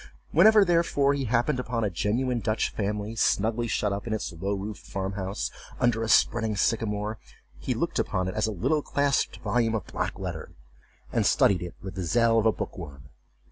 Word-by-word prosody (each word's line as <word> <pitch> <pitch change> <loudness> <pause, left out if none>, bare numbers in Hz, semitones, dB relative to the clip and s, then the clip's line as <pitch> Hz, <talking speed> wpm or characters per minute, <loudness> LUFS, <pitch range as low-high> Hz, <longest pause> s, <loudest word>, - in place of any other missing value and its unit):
Whenever, 210 +5 +6
therefore, 165 -5 +2
he 140 -1 -2
happened 125 +4 +1
upon 120 -2 -2
a 105 - +1
genuine 120 +8 0
Dutch 110 0 -1
family, 105 +1 -3
snugly 115 +2 +1
shut 105 -2 0
up 100 +3 -5
in 110 - -1
its 110 - -3
low 95 +5 -2
roofed 100 +1 -6
farmhouse, 95 +1 -3 0.3
under 120 -3 +2
a 115 - -2
spreading 110 -1 +3
sycamore, 105 0 -1 0.4
he - - -2
looked - - -1
upon 95 0 -1
it 95 - -3
as 110 0 0
a - - -2
little 150 - 0
clasped 140 -1 0
volume 115 -2 +1
of 105 - -3
black - - -3
letter, - - -6 0.6
and - - +2
studied 95 -4 +3
it 90 -1 -6
with 95 -2 -6
the 95 - -5
zeal 115 +5 +3
of 110 - +2
a - - +5
book 105 - -6
worm. 70 -5 -10
110 Hz, 190 wpm, -27 LUFS, 100-120 Hz, 0.6 s, Whenever